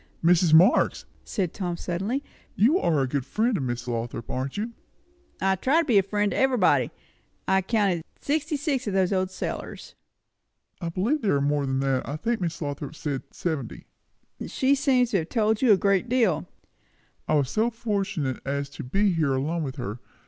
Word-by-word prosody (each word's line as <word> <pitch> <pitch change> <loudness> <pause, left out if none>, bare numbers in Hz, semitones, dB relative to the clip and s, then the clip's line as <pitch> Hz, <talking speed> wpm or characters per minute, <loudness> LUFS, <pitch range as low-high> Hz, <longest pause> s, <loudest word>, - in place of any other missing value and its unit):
"Mrs. 170 0 +4
Marx," 175 +8 +5 0.2
said 185 -7 -2
Tom 175 -4 -3
suddenly, 195 +12 -2 0.3
"you 270 - +4
are 155 - +2
a - - -1
good 135 0 -1
friend 225 - 0
of 175 - -1
Miss 120 -1 -3
Lothrop, 115 -1 -4
aren't 130 +4 -3
you?" 220 +3 -2 0.7
"Try 190 -1 +1 0.2
to - - +3
be 225 -7 +5
a - - +4
friend 205 +1 0
to - - -2
everybody. 255 -7 +3 0.6
I've 190 -1 +2
counted 200 -7 +1 0.2
sixty 305 +1 -1
six 275 -5 -1
o' - - 0
these 190 0 +2
old 185 -1 +1
cellars!" 185 - -6 0.9
"I 170 - -2
believe 220 - 0
there 200 -8 +2
are - - +2
more 145 0 0
than 135 0 0
that. 135 -1 0
I 145 - -3
think 225 +7 -2
Miss 170 -1 -2
Lothrop 145 +1 -5
said 145 -4 -3
seventy." 160 -5 -4 0.6
"She 270 0 +2
seems 260 -4 +2
to 195 - +3
have 160 - -5
told 220 -2 +1
you 255 -4 +5
a 200 - +7
good 200 +3 +1
deal." 225 -11 +2 0.8
"I 155 - +2
was 140 -3 +1
so 220 +2 +2
fortunate 200 - -2
as 140 0 -3
to - - -7
be 195 +9 +1
here 155 -5 +1
alone 155 +6 -1
with 135 -4 -4
her. 120 -3 -5
185 Hz, 185 wpm, -26 LUFS, 145-220 Hz, 0.9 s, a